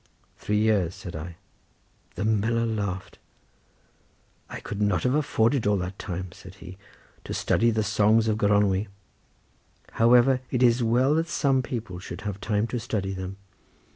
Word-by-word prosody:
"Three 105 - -2
years," 105 -5 +2
said 95 -4 -8
I. 80 +2 -7 0.8
The 100 - -2
miller 110 +2 +1
laughed. 100 -5 -4 1.3
"I - - -6
could 105 0 -6
not 105 0 +1
have 125 - +2
afforded 135 -5 +1
all 105 -1 +3
that 90 +1 -5
time," 90 -1 -5
said 95 0 -13
he, 95 -1 -12 0.4
"to - - -5
study 115 +2 +2
the 110 -1 0
songs 105 +2 +3
of 110 0 0
Gronwy. 100 -1 +2 1.0
However, 125 +3 +4
it 125 -1 +1
is 120 0 +4
well 125 +5 +3
that 165 +2 +1
some 135 -2 +2
people 115 -8 -5
should 90 0 -8
have 100 -2 -5
time 105 +1 0
to 120 - 0
study 105 -4 -3
them. 95 +1 -6
105 Hz, 155 wpm, -26 LUFS, 95-115 Hz, 1.3 s, However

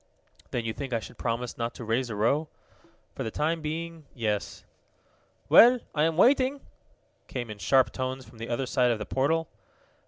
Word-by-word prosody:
"Then 120 -2 -3
you 110 - -2
think 135 0 -5
I 115 - +1
should 105 - -12
promise 120 +1 -3
not 115 0 -2
to - - -7
raise 120 +3 0
a 110 - -4
row?" 140 +9 +1 0.7
"For - - -7
the 110 - -2
time 160 +7 -1
being 160 0 -5
yes." 105 -4 -2 0.8
"Well, 245 +2 +8
I 150 0 +2
am 165 -1 0
waiting!" 265 +5 +4 0.7
came 120 -4 -5
in 105 - -9
sharp 130 0 +3
tones 130 0 -4
from 115 - -16
the 115 - -6
other 120 +3 -1
side 125 -1 +2
of 115 - +1
the 105 - -5
portal. 160 +7 0
130 Hz, 185 wpm, -27 LUFS, 115-160 Hz, 0.8 s, Well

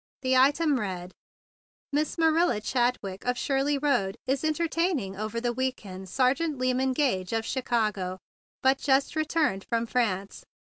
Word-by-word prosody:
The 260 0 +2
item 285 +2 +4
read: 185 -4 -4 0.8
"Miss 300 +3 0
Marilla 325 -4 +3
Chadwick, 240 -5 -1
of 250 0 0
Shirley 275 +2 +1
Road, 245 -10 0
is 270 +2 0
entertaining 315 - 0
over 215 +3 -3
the 240 0 -1
week 260 -2 -2
end 190 0 -8
Sergeant 275 - +1
Lyman 255 +1 +1
Gage, 230 -10 0
of 225 0 0
Chicago, 215 -7 -1 0.5
but 265 +1 +4
just 275 +1 +2
returned 310 -10 0
from 230 0 -1
France. 205 -5 -1
255 Hz, 140 wpm, -27 LUFS, 210-285 Hz, 0.8 s, item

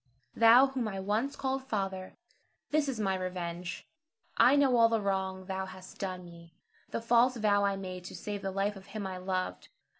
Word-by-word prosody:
Thou 230 +3 +8
whom 265 -4 -2
I 195 -2 -4
once 215 +9 -1
called 265 0 -1
father, 195 -6 -3 0.5
this 300 -2 +2
is 245 -5 -3
my 195 -2 +1
revenge. 180 -1 -4 0.5
I 260 - +6
know 275 -3 +4
all 230 -1 +6
the 225 -1 +2
wrong 190 -2 -2
thou 190 0 -3
hast 185 0 -12
done 185 -2 -4
me, 170 -1 -14 0.3
the - - -3
false 240 +2 +4
vow 205 -2 +3
I 200 -1 +2
made 185 -2 -6
to - - -8
save 205 -1 -5
the 195 - -2
life 200 +2 -1
of 195 0 -12
him 215 -2 -5
I 190 -1 -4
loved. 185 0 -3
195 Hz, 190 wpm, -31 LUFS, 185-230 Hz, 0.5 s, Thou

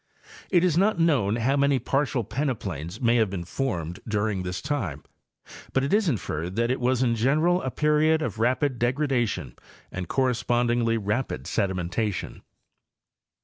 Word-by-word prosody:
It 175 -2 +3
is 175 -2 +3
not 205 0 +3
known 140 -12 +2
how 120 +4 +1
many 140 -1 +3
partial 135 0 0
peneplains 105 - -3
may 120 -1 +3
have 110 -3 +2
been 95 -2 -4
formed 90 - -3
during 105 -2 0
this 90 0 -4
time, 115 - -3 0.7
but 135 - +2
it 140 - -1
is 210 -4 +3
in 135 - +2
ferred 85 +1 -4
that 115 +2 +1
it 130 - -1
was 125 +1 +1
in 120 -2 +2
general 155 +10 +2
a 130 - -2
period 150 +3 +2
of 110 -6 -4
rapid 125 +2 +1
degradation 125 -2 0 0.4
and 90 -1 -5
correspondingly 120 -2 +1
rapid 105 - -2
sedimentation. 95 +3 -2
120 Hz, 150 wpm, -26 LUFS, 105-140 Hz, 0.7 s, It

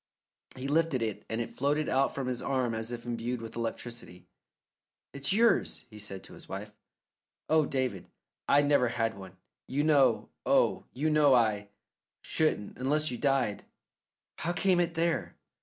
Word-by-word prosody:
He 130 +1 -5
lifted 150 -4 +2
it, 110 -3 -4
and 115 - -2
it 120 - -3
floated 145 +3 0
out 135 +1 +1
from 135 - -2
his 125 -1 -2
arm 130 -4 0
as 110 +1 -3
if 120 0 -6
imbued 120 +1 -3
with 115 -1 -8
electricity. 115 -5 -5 0.9
"It's 140 0 -1
yours," 225 - +2
he 105 - -11
said 100 -2 -5
to - - -11
his - - -12
wife. 100 +2 -6 0.8
"Oh, 155 -2 +4
David, 130 -9 -2 0.4
I 145 +1 +6
never 145 -3 +4
had 115 -2 -1
one. 95 -1 -11 0.3
You 140 +3 0
know, 145 -3 +3
oh, - - +2
you 155 +4 0
know 150 -3 +5
I 105 -4 +1 0.5
shouldn't 155 -11 0
unless 150 +3 +1
you 120 - -5
died. 135 -7 +1 0.8
How 175 - -1
came 185 0 +2
it 175 -1 0
there?" 165 0 0
130 Hz, 160 wpm, -30 LUFS, 115-150 Hz, 0.9 s, I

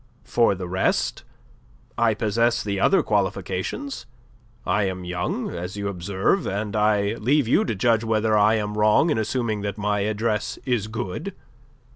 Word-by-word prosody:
"For 115 -4 +2
the 90 -1 -6
rest: 95 +1 0 0.7
I 115 -2 +2
possess 115 +1 +1
the 100 -2 -2
other 195 - +4
qualifications. 100 - -2 0.6
I 105 - +1
am 95 -1 -4
young, 90 0 -3
as 90 +3 -6
you 100 0 -2
observe: 95 - 0
and 105 +2 -3
I 105 -1 +2
leave 135 +3 +2
you - - +3
to 115 - -2
judge 115 +2 +2
whether 110 -1 +1
I 105 +1 +4
am 105 -1 -2
wrong 110 +10 +4
in 130 - +1
assuming 110 -1 -1
that 100 +1 -4
my 105 0 0
address 105 +1 -1
is 120 -6 0
good. 115 - -5
105 Hz, 155 wpm, -24 LUFS, 100-115 Hz, 0.7 s, other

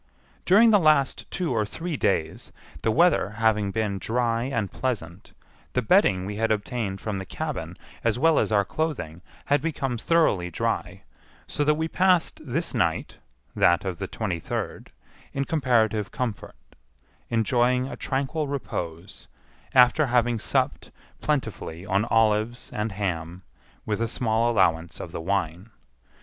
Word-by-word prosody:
During 220 +5 +6
the 205 - +6
last 155 -5 +2
two 175 -7 -2
or 110 -2 +1
three 160 +10 -5
days, 80 - -1 0.3
the - - +1
weather 165 - +3
having 110 -3 +2
been 100 -2 -2
dry 115 +2 0
and 115 -8 -2
pleasant, 100 -8 -4 0.4
the - - 0
bedding 95 0 +3
we 100 +1 -5
had 115 0 +1
obtained 105 -2 -2
from 105 -2 -3
the - - -5
cabin, - - -5 0.3
as 115 0 +1
well 160 +3 +4
as - - 0
our 100 -2 +3
clothing, 125 - -3 0.2
had 145 -1 +2
become 135 -6 -2
thoroughly 115 - +2
dry, 85 - -3 0.4
so 145 - -2
that 150 +1 +3
we 160 +1 -1
passed 180 0 +2
this 155 +5 -2
night 85 -10 -1 0.4
(that 85 +2 +3
of 95 -1 -3
the 95 - -3
twenty 95 -6 -3
third) - - -5 0.4
in 140 0 -1
comparative 115 -8 +1
comfort, 120 -5 -4 0.7
enjoying 125 +2 +2
a - - -6
tranquil 140 +3 -2
repose, 90 - -5 0.5
after 130 +4 +6
having 120 -1 +2
supped - - -1 0.3
plentifully 115 - -2
on 100 +2 +1
olives 115 +1 +1
and 105 +1 -2
ham, 90 -3 -3 0.4
with 105 +1 -2
a 115 - +1
small 115 0 +1
allowance 85 -7 +1
of - - -7
the - - -5
wine. 90 +1 -2
115 Hz, 145 wpm, -25 LUFS, 100-135 Hz, 0.7 s, During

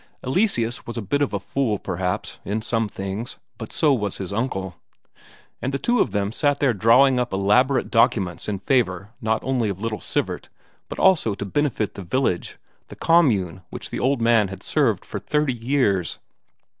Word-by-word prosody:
Eleseus 130 - 0
was 120 - -5
a - - -1
bit 145 +9 0
of 145 - +1
a 100 - -2
fool, 110 +1 -1
perhaps, 90 -1 -3
in 105 +2 -2
some 115 -1 -1
things, 100 +6 -5 0.2
but 110 - -7
so 150 -3 +3
was 105 -6 -1
his 95 0 -5
uncle; 95 -5 -2 0.9
and 130 - -1
the 140 - -1
two 240 - +1
of - - +3
them 100 0 -1
sat 145 +4 +1
there 135 -4 +3
drawing 125 +6 +5
up 125 -1 -1
elaborate 115 +8 +2
documents 115 -7 +2
in 100 - -1
favour 100 -3 0
not 110 0 0
only 125 -5 0
of 95 -2 -4
little 110 0 -3
Sivert - - -2 0.4
but - - -6
also 160 - +3
to 100 - -5
benefit 115 -1 -1
the 100 - -8
village, 95 0 -1 0.3
the - - -11
commune 110 - +2
which - - -7
the - - -3
old 135 -1 +1
man 115 -3 +4
had 95 +1 -9
served 120 - +1
for 105 - -5
thirty 150 +6 0
years. 115 -7 0
115 Hz, 180 wpm, -23 LUFS, 100-135 Hz, 0.9 s, drawing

